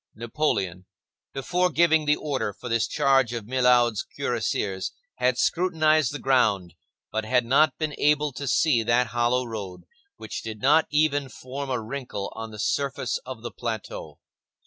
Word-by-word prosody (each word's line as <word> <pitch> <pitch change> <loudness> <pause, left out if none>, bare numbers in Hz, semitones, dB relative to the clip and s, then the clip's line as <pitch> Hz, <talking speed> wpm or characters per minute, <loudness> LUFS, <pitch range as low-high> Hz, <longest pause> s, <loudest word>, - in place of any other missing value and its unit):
Napoleon, 110 - -2 0.4
before 180 +7 0
giving 160 -2 +3
the 150 0 +4
order 140 -9 -2
for 125 - -9
this 115 -1 +1
charge 135 -3 +2
of 115 -3 -4
Milhaud's 125 -3 +3
cuirassiers, 110 -7 -2 0.2
had 125 0 +1
scrutinized 155 -5 +2
the 145 - -4
ground, 105 - +2 0.4
but 110 +1 -1
had 125 +2 +1
not 140 +3 +3
been 155 -2 -2
able 150 0 +2
to 140 +2 -6
see 130 -2 +3
that 120 +2 +2
hollow 120 +1 +1
road, 105 -6 -7 0.3
which - - -6
did 110 -1 -7
not 150 +7 +4
even 145 -2 +1
form 135 +4 -7
a 125 -2 0
wrinkle 115 -3 -5
on 110 0 -6
the 110 - -10
surface 140 - -1
of - - -7
the - - -5
plateau. - - -6
125 Hz, 155 wpm, -25 LUFS, 115-150 Hz, 0.4 s, the